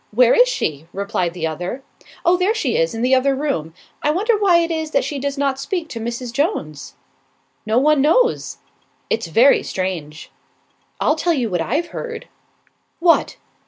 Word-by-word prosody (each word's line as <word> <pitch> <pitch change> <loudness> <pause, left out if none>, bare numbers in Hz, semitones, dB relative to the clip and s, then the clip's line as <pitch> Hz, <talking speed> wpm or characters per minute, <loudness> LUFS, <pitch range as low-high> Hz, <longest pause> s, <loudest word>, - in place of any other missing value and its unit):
where 240 +2 +4
is - - +5
she?" 155 - -3
replied 200 -3 -2
the 165 -2 -3
other. 175 - -4 0.4
"Oh, 350 +1 +5
there 370 +5 +1
she 280 - -1
is, 165 +6 +1
in 225 - -3
the 255 +1 +2
other 270 +1 +3
room. 265 - -2 0.3
I - - +1
wonder 415 +9 +2
why 400 -4 +4
it 335 0 0
is 320 -1 -2
that - - +1
she 285 - -4
does 280 +1 -3
not 275 -1 0
speak 330 +2 -3
to 230 - -6
Mrs. 235 +1 -5
Jones." 155 - -2 0.7
"No 220 +2 +2
one 295 +2 +4
knows." 470 - +2 0.5
"It's 225 -6 0
very 235 - +5
strange." 170 -5 -5 0.7
"I'll 305 - +2
tell 340 +2 +1
you 245 -8 -1
what 175 -2 0
I've 300 - -1
heard." 465 -1 -7 0.7
"What?" 335 -1 +3
270 Hz, 175 wpm, -20 LUFS, 200-330 Hz, 0.7 s, is